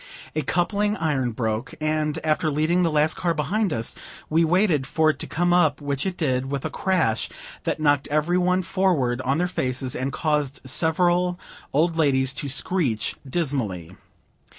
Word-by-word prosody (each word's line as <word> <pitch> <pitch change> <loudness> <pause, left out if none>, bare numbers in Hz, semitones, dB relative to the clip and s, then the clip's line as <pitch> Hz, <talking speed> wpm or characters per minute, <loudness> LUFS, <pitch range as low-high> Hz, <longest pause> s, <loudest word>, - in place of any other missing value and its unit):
A 155 - +1
coupling 205 +7 0
iron 140 -6 0
broke; 110 +5 -3
and, 155 0 0
after 155 0 +1
leaving 155 +4 +1
the 170 - +3
last 155 0 +2
car 170 -2 -1
behind 195 +7 0
us, 115 -4 -2 0.4
we 165 +2 +4
waited 165 -4 +2
for 155 -1 +3
it - - -12
to - - -4
come 175 +2 +1
up, 155 -5 +3
which 140 +1 -2
it 185 - -3
did, 130 -4 0
with 140 -1 -3
a - - -2
crash 180 - 0 0.4
that - - -1
knocked 145 -2 +2
every 155 +5 +1
one 180 +1 +2
forward 165 -10 +1
on 135 +3 0
their 175 - +1
faces, 130 -6 -2
and 130 +2 -2
caused 150 -2 -1
several 175 +5 +1 0.3
old 165 +3 +1
ladies 130 -4 +2
to 140 0 -3
screech 135 - +1
dismally. 110 - -2
155 Hz, 170 wpm, -24 LUFS, 135-175 Hz, 0.4 s, we